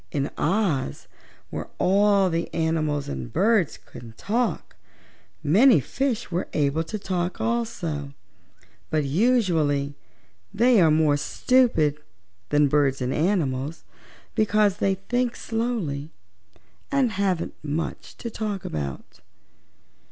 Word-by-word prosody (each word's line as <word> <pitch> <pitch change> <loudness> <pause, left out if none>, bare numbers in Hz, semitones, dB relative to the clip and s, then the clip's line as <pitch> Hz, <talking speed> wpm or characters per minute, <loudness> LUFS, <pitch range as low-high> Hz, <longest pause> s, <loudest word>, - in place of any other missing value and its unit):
In 140 -1 -1
Oz, 165 - 0 0.4
where - - -5
all 195 0 +3
the 165 +1 -2
animals 155 -3 0
and 65 -3 -5
birds 210 -5 +2
can 115 -2 -12
talk, 235 +3 -2 0.7
many 215 - +6
fishes 245 -8 -2
are 175 - -1
able 150 +1 +1
to 215 - -4
talk 185 -2 -3
also, 170 -12 -2 0.7
but 155 -1 +1
usually 160 - +2 0.6
they 235 -2 +4
are 165 - +5
more 155 -1 +3
stupid 160 - +2 0.5
than 145 0 +4
birds 140 -1 +2
and 125 0 -1
animals 155 -4 -1 0.5
because 210 -2 +2
they 195 -2 +1
think 245 +5 -1
slowly 220 -12 -3 0.8
and 270 -4 +2
haven't 190 -4 -1
much 155 +2 -4
to 235 - -6
talk 210 -3 -4
about. 70 -3 -5
175 Hz, 110 wpm, -24 LUFS, 145-215 Hz, 0.8 s, many